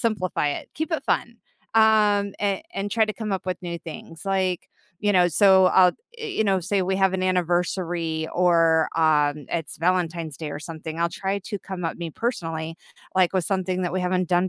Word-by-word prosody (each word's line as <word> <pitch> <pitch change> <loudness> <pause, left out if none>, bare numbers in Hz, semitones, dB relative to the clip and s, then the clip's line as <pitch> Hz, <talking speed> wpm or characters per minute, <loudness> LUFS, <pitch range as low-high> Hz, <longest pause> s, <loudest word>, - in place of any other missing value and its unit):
simplify 205 -9 0
it. 145 - -4
Keep 315 +2 -3
it 320 - 0
fun, - - -1 0.4
um, 210 -2 +4
a 200 +5 0
and 195 +1 -2
try 225 -1 +3
to 215 - -2
come 215 -3 -4
at 190 - -2
with 180 -1 -3
new 170 -1 -4
things, 165 0 -9
like, 190 -2 -1 0.3
you 205 - +2
know, 180 -1 +5
so, 190 +2 +6
I'll 185 0 +6 0.3
i - - -5
you 390 - -1
know, 195 -2 +2
say 195 +3 0
we 190 +1 0
have 190 -1 +3
an 185 - -1
anniversary 175 -2 0
or, 165 -2 +3
um, 150 -3 +2
it's 165 -3 -3
Valentine's 170 -3 0
Day 155 -2 -5
or - - -5
something, 160 0 -7
I'll 170 - +2
try 195 +3 -2
to 205 +1 -5
come 185 -2 -6
up 165 - -2
me 170 -1 -4
personally, 165 -6 -3 0.4
like, 185 -1 +3
with 185 - +1
something 185 0 -1
that 175 - -2
we 185 - 0
haven't 180 -1 0
done 180 +1 +2
180 Hz, 205 wpm, -24 LUFS, 165-195 Hz, 0.4 s, so